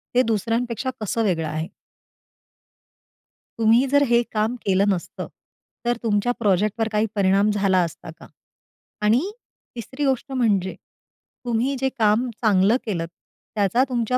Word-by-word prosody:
ते 250 Hz, -, +6 dB
दुसऱ्यांपेक्षा 230 Hz, +2 st, -1 dB
कसं 225 Hz, +2 st, -1 dB
वेगळं 165 Hz, -6 st, 0 dB
आहे? 155 Hz, +2 st, -3 dB, 1.9 s
तुम्ही 230 Hz, +4 st, +4 dB
जर 285 Hz, +2 st, +4 dB
हे 240 Hz, 0 st, +4 dB
काम 220 Hz, +3 st, 0 dB
केलं 195 Hz, 0 st, +3 dB
नसतं. 185 Hz, -4 st, -3 dB, 0.6 s
तर 240 Hz, -1 st, +1 dB
तुमच्या 220 Hz, +2 st, +1 dB
प्रोजेक्टवर 215 Hz, +1 st, +1 dB
काही 210 Hz, +1 st, +1 dB
परिणाम 200 Hz, +1 st, +3 dB
झाला 195 Hz, -2 st, +2 dB
असता 165 Hz, -1 st, -7 dB
का? -, -, -13 dB, 0.7 s
आणि 245 Hz, -, +2 dB, 0.4 s
3री 260 Hz, +5 st, -4 dB
गोष्ट 270 Hz, +1 st, -1 dB
म्हणजे 200 Hz, -8 st, +1 dB, 0.7 s
तुम्ही 245 Hz, +3 st, 0 dB
जे 265 Hz, -, +1 dB
काम 220 Hz, +4 st, +3 dB
चांगलं 210 Hz, +1 st, +4 dB
केलंत. 170 Hz, -6 st, -2 dB, 0.5 s
त्याचा 205 Hz, +5 st, +2 dB
तुमच्या 245 Hz, 0 st, 0 dB
220 Hz, 125 wpm, -23 LUFS, 195-245 Hz, 1.9 s, ते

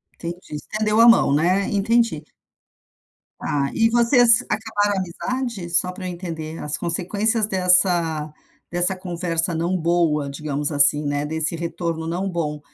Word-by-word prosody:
Entendi, 170 Hz, -2 st, -8 dB
estendeu 215 Hz, +7 st, -1 dB
a 235 Hz, -, +7 dB
mão, 230 Hz, -11 st, +5 dB
né, 180 Hz, +6 st, +1 dB
entendi. 205 Hz, -5 st, +1 dB, 1.2 s
Está, 140 Hz, -1 st, -1 dB
e 225 Hz, 0 st, +3 dB
vocês 240 Hz, 0 st, +5 dB
acabaram 210 Hz, -2 st, 0 dB
a -, -, 0 dB
amizade, 205 Hz, +1 st, -4 dB
só 180 Hz, +2 st, +2 dB
para 185 Hz, 0 st, -9 dB
eu -, -, -4 dB
entender, 165 Hz, -3 st, -6 dB
as 150 Hz, 0 st, -3 dB
consequências 205 Hz, +6 st, -1 dB
dessa 180 Hz, -5 st, +2 dB, 0.4 s
dessa 175 Hz, +2 st, 0 dB
conversa 175 Hz, -1 st, -2 dB
não 170 Hz, +3 st, -1 dB
boa 165 Hz, -4 st, +1 dB
digamos 145 Hz, +1 st, -3 dB
assim, 145 Hz, +1 st, +3 dB
né, 145 Hz, 0 st, -1 dB
desse 160 Hz, +2 st, -2 dB
retorno 165 Hz, -1 st, -4 dB
não 185 Hz, +4 st, -2 dB
bom, 150 Hz, -4 st, -3 dB
175 Hz, 140 wpm, -22 LUFS, 160-205 Hz, 1.2 s, a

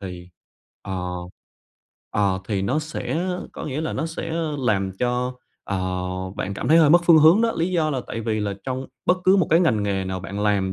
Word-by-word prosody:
Thì, 90 Hz, -2 st, -8 dB, 0.5 s
ờ, 95 Hz, -2 st, -4 dB, 1.0 s
ờ, 100 Hz, -2 st, +1 dB
thì 100 Hz, -3 st, 0 dB
nó 130 Hz, +9 st, +1 dB
sẽ 155 Hz, +3 st, -3 dB, 0.3 s
có -, -, -7 dB
nghĩa 145 Hz, +2 st, -3 dB
là 160 Hz, -, -2 dB
nó 160 Hz, -, -2 dB
sẽ 160 Hz, 0 st, -5 dB, 0.3 s
làm 100 Hz, -7 st, 0 dB
cho, 125 Hz, +1 st, 0 dB, 0.3 s
ờ, 100 Hz, -2 st, -2 dB, 0.6 s
bạn 100 Hz, -, -3 dB
cảm 125 Hz, -, -3 dB
thấy 165 Hz, +2 st, +6 dB
hơi 150 Hz, -2 st, +6 dB
mất 175 Hz, +1 st, +6 dB
phương 165 Hz, -2 st, +7 dB
hướng 160 Hz, +8 st, +7 dB
đó. 230 Hz, -, +2 dB
Lý 170 Hz, +3 st, 0 dB
do 155 Hz, -3 st, +1 dB
là 135 Hz, -, -1 dB
tại 115 Hz, -, -4 dB
vì 110 Hz, -1 st, -1 dB
là 100 Hz, -1 st, -2 dB
trong 130 Hz, 0 st, -3 dB, 0.2 s
bất 180 Hz, -, +4 dB
cứ 190 Hz, +1 st, +6 dB
một 185 Hz, -, +3 dB
cái 165 Hz, +3 st, +5 dB
ngành 115 Hz, -, +2 dB
nghề 95 Hz, -2 st, -1 dB
nào 95 Hz, 0 st, -4 dB
bạn 100 Hz, +2 st, -5 dB
làm, 100 Hz, -2 st, +1 dB
125 Hz, 215 wpm, -23 LUFS, 100-160 Hz, 1.0 s, phương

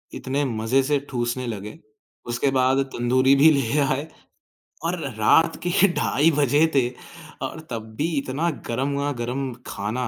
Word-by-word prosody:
इतने 140 Hz, +3 st, -2 dB
मजे 115 Hz, +2 st, +1 dB
से 145 Hz, +1 st, +1 dB
ठूँसने 120 Hz, 0 st, -2 dB
लगे, 105 Hz, -2 st, -6 dB, 0.5 s
उसके 120 Hz, +3 st, 0 dB
बाद 130 Hz, 0 st, +2 dB, 0.2 s
तंदूरी 130 Hz, +3 st, +3 dB
भी 145 Hz, +3 st, +7 dB
ले 140 Hz, -1 st, +1 dB
आए 140 Hz, +2 st, 0 dB, 0.8 s
और 175 Hz, +1 st, -1 dB
र 135 Hz, -, -4 dB
रात 165 Hz, +10 st, +4 dB
के 180 Hz, +2 st, +4 dB
ढाई 155 Hz, +1 st, +2 dB
बजे 145 Hz, +2 st, +4 dB
थे 125 Hz, -3 st, +3 dB, 0.6 s
और -, -, -9 dB
तब 110 Hz, -1 st, -6 dB
भी 155 Hz, -, 0 dB
इतना 140 Hz, +5 st, -2 dB, 0.2 s
गरमा-गरम 135 Hz, 0 st, -2 dB, 0.2 s
खाना। 110 Hz, +5 st, -3 dB
130 Hz, 145 wpm, -23 LUFS, 120-145 Hz, 0.8 s, भी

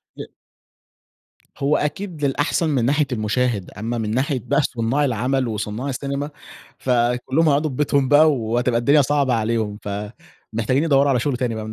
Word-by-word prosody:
ي -, -, -8 dB, 1.3 s
هو 140 Hz, +2 st, +1 dB
أكيد 150 Hz, +1 st, -3 dB
للأحسن 145 Hz, +4 st, 0 dB
من 130 Hz, -6 st, +1 dB
ناحية 145 Hz, +3 st, +2 dB
المشاهد، 110 Hz, -2 st, -1 dB
أمّا 115 Hz, +3 st, -4 dB
من 110 Hz, -2 st, -2 dB
ناحية 130 Hz, +3 st, 0 dB
بقى 145 Hz, +2 st, +2 dB
صناع 130 Hz, +2 st, 0 dB
العمل 130 Hz, +1 st, 0 dB
وصناع 110 Hz, +4 st, -4 dB
السينما، 140 Hz, +2 st, -3 dB, 0.5 s
فكلهم 125 Hz, +5 st, +1 dB
هيقعدوا 150 Hz, +2 st, +2 dB
في 130 Hz, -, -7 dB
ببيتهم 140 Hz, -1 st, +1 dB
بقى 155 Hz, +2 st, +6 dB
وهتبقى 120 Hz, 0 st, 0 dB
الدنيا 140 Hz, +5 st, +4 dB
صعبة 140 Hz, -2 st, +1 dB
عليهم، 110 Hz, -2 st, -1 dB
فمحتاجين 110 Hz, +5 st, -4 dB
يدوروا 140 Hz, -3 st, +3 dB
على 130 Hz, -3 st, +2 dB
شغل 130 Hz, +1 st, -1 dB
تاني 120 Hz, -2 st, -2 dB
بقى 110 Hz, -1 st, -5 dB
من 110 Hz, -, -6 dB
130 Hz, 160 wpm, -21 LUFS, 115-145 Hz, 1.3 s, بقى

